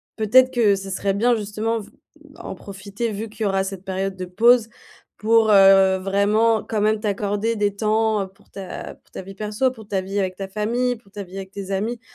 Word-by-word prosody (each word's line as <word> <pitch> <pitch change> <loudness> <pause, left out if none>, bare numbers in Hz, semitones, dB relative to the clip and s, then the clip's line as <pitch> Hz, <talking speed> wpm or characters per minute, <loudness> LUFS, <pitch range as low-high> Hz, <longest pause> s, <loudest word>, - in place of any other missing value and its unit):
peut-être 255 +4 +4
que 215 -5 +3
ce 195 0 -7
serait 195 +1 -1
bien 235 +4 +2
justement 215 +2 -2
v 205 - -14 0.3
bah 305 +4 -15
en - - -5
profiter 200 +4 -5
vu 215 +2 -5
qu'il 215 +1 -7
y - - +2
aura 195 0 0
cette 195 -1 -7
période 190 0 -3
de 185 - -6
pause, 230 +5 +4 0.5
pour, 225 0 +3
heu, 195 -1 +6
vraiment 205 +4 +2
quand 215 - -3
même 215 0 +1
t'accorder 205 +2 -1
des 205 -1 0
temps, 215 0 +1
heu, 190 - -4
pour 200 +2 -27
ta 195 -2 -8
pour - - -33
ta - - -7
vie 195 +1 -11
perso. 215 +5 -1
Pour 220 -4 -13
ta 195 - 0
vie 195 +2 -3
avec 185 -1 -2
ta 195 -1 -5
famille, 235 +5 -1
pour 215 -4 -21
ta 205 -1 -6
vie 185 +1 -13
avec 190 0 -7
tes 195 -1 -7
amis, 220 +5 -2
205 Hz, 220 wpm, -22 LUFS, 195-225 Hz, 0.5 s, heu